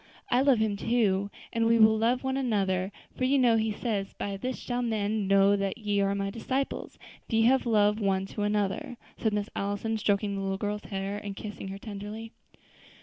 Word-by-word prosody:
I 245 - +4
love 275 -2 +5
Him 215 -2 0
too, 200 -3 +1 0.2
and 230 0 +2
we 230 0 +5
will 220 -1 +6
love 235 +4 +1
one 265 0 -1
another; 195 -7 0 0.2
for - - -3
you 270 +2 +3
know 245 -3 +5
He 220 0 +1
says, 205 -2 -2
'By 200 -1 -4
this 250 +6 -3
shall 245 0 -3
men 215 -3 -1
know 195 +1 +5
that 195 +1 -2
ye 205 -3 0
are 200 0 +1
my 195 0 -2
disciples, 260 +5 -3 0.3
if - - -14
ye 225 0 +4
have 255 +2 +3
love 210 -1 +3
one 195 -2 +1
to 210 - -3
another,'" 205 +3 -1 0.2
said 220 - +1
Miss 205 0 -2
Allison, 205 +3 -2
stroking 205 0 +1
the 195 - -3
little 195 0 -1
girl's 210 +1 -3
hair, 195 0 -3
and 200 -1 -6
kissing 205 -1 -7
her 195 +1 -6
tenderly. 210 +2 -7
210 Hz, 205 wpm, -28 LUFS, 200-230 Hz, 0.3 s, will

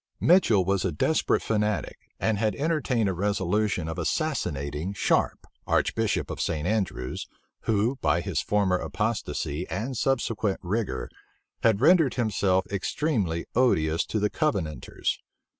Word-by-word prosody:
Mitchel 120 - +4
was 95 0 +1
a 95 - 0
desperate 120 - +1
fanatic, 105 -2 -1 0.2
and 110 -2 +1
had 110 -1 +1
entertained 140 -7 0
a 95 - 0
resolution 100 -1 0
of 80 +2 -4
assassinating 85 - -2
Sharpe, - - +1 0.2
archbishop - - +1
of - - -4
St. 75 0 -1
Andrews, 95 - -2 0.4
who, 110 +5 +1
by 85 - +1
his 95 -1 -1
former 100 -4 +2
apostasy 105 -7 -2
and 115 +8 -3
subsequent 115 -5 0
rigor, 90 - -2 0.5
had 110 -2 +3
rendered 160 -4 +5
himself 100 -5 +1
extremely 100 - -1
odious 80 -10 +2
to - - -2
the 105 0 +1
Covenanters. 85 - -1
105 Hz, 125 wpm, -26 LUFS, 90-115 Hz, 0.5 s, rendered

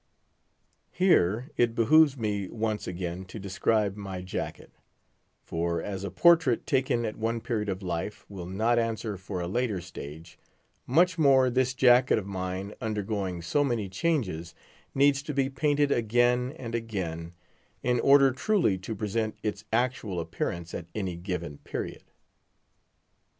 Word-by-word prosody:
Here 130 - +2
it 115 -1 +2
behooves 145 +4 +5
me 105 -4 -2
once 110 0 -2
again 90 0 -4
to 90 - -9
describe 100 +1 0
my 95 -3 -6
jacket; 90 - -5 0.7
for, 85 +1 -1
as 100 -2 -5
a 100 - -3
portrait 160 - +4
taken 130 -4 +1
at 110 - -4
one 115 +1 -1
period 110 -3 -2
of 95 0 -3
life 90 +3 -4
will 95 -4 -8
not 110 +6 +1
answer 110 -2 -2
for 95 -1 -5
a 85 - -3
later 110 0 -1
stage; 85 -1 -10 0.5
much 170 +5 +3
more 135 -4 +5
this 130 +1 +1
jacket 125 0 +5
of 105 - -3
mine, 95 +1 -4
undergoing 100 -5 -2
so 145 - +2
many 120 -7 -1
changes, 95 - -1 0.4
needs 140 0 +4
to 150 0 -5
be 135 0 +1
painted 145 +1 +1
again 120 +2 +2
and 115 -5 -6
again, 90 -8 -4 0.5
in 125 -1 +2
order 140 0 +6
truly 150 - +1
to 110 +4 -5
present 110 +1 -2
its 105 -1 -3
actual 115 -5 0
appearance 85 +1 -4
at 85 - -5
any 95 -5 -2
given 85 -4 -5
period. - - -5
110 Hz, 145 wpm, -28 LUFS, 95-125 Hz, 0.7 s, order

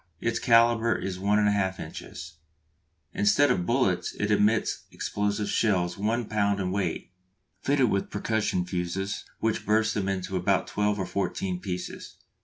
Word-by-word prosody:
Its 115 +4 -1
calibre 115 -1 +4
is 95 -1 -4
1 100 +2 +2
1/2 100 -3 +1
inches. 80 0 -8 0.8
Instead 125 +7 +4
of 90 -6 0
bullets - - +1
it 105 +1 -1
emits 105 +2 +2
explosive 105 0 -2
shells 90 -5 +1
1 110 +4 -1
lb. 100 -1 0
in 90 -1 -1
weight, 95 -4 -2 0.5
fitted 135 -4 +2
with 100 - -1
percussion 105 -4 -1
fuses 90 +2 -3 0.2
which 110 -1 0
burst 110 +1 +2
them 95 -2 -1
into 95 -1 -3
about 90 - +1
twelve 105 0 0
or 95 - -2
fourteen 95 -2 -2
pieces. 90 -2 -6
100 Hz, 145 wpm, -27 LUFS, 95-110 Hz, 0.8 s, calibre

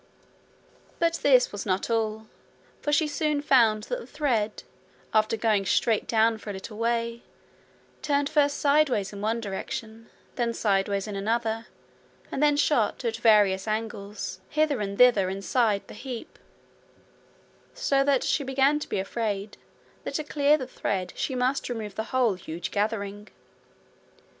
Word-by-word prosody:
But 335 0 +1
this 255 -3 +5
was 205 - -5
not 190 -1 -1
all, 220 -1 -1 0.6
for 295 - -1
she 300 +1 +3
soon 300 -1 0
found 230 -7 +4
that - - -3
the - - -11
thread, 235 -8 -1 0.5
after 215 +1 +2
going 215 -3 +2
straight 215 +3 +1
down 225 0 +2
for 215 - -9
a - - -3
little 210 +3 -8
way, 235 0 -1 0.8
turned 285 -1 +1
first 290 -1 +2
sideways 280 -9 +2
in 200 - -7
one 220 +2 0
direction, 225 +2 -6 0.3
then 235 -2 0
sideways 200 -1 0
in 205 - -5
another, 225 +2 -1 0.6
and 270 - -2
then 295 -1 +4
shot, 260 -5 +1
at 225 -1 -1
various 210 -4 +4
angles, 210 -3 -4
hither 300 -5 +1
and 200 -1 -3
thither 230 -7 +5
inside 200 +2 0
the - - -10
heap, 245 +1 -8 1.4
so 280 - +2
that 275 -2 +2
she 290 - +1
began 270 +2 +2
to - - -7
be - - -1
afraid 205 0 -3 0.5
that - - -5
to 305 - -1
clear 295 0 +3
the 260 - -5
thread 195 -7 -3
she 265 - -2
must 255 +2 0
remove 220 -4 -4
the 220 +3 -4
whole 255 -5 +2
huge 170 -1 -6
gathering. 205 -1 -2
225 Hz, 150 wpm, -26 LUFS, 205-270 Hz, 1.4 s, this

